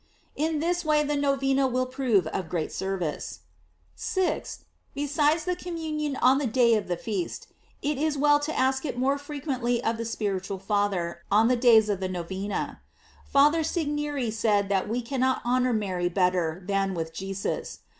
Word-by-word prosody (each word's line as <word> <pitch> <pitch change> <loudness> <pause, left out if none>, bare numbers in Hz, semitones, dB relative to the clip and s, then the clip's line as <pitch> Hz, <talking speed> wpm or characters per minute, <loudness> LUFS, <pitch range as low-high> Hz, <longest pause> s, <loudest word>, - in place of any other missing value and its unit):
In 315 +1 0
this 350 +3 0
way 305 -1 +3
the 295 0 -1
Novena 275 -1 +2
will 255 0 0
prove 255 - +1
of 160 +1 -4
great 165 -3 -2
service. 190 -5 -3 0.5
6th. 375 -2 -2 0.3
Be 290 - -1
sides 300 +2 +2
the 360 0 0
communion 315 -5 -3
on 265 +1 +4
the 285 - 0
day 235 0 +4
of 215 -3 0
the 175 -1 -1
feast, 195 -2 -4 0.3
it 290 -1 -1
is 305 -1 0
well 290 +1 +4
to 300 +2 -3
ask 265 0 +2
it 275 -5 -4
more 270 +3 +1
frequently 270 -5 -2
of 225 0 0
the 230 - -4
spiritual 200 -4 -2
father 195 -4 -1
on 220 +3 +4
the 250 - +4
days 235 -3 +6
of 205 -3 -1
the 185 -1 -2
Novena. 190 +3 -4 0.5
Father 295 +4 +4
Segneri 295 - -1
said 205 -3 +1
that 195 0 0
we 240 +2 -1
cannot 260 +1 0
honor 250 +1 +2
Mary 185 -5 -1
better 180 -2 0
than 195 -1 0
with 160 -1 -4
Jesus. 195 +3 -4
245 Hz, 170 wpm, -27 LUFS, 195-290 Hz, 0.5 s, days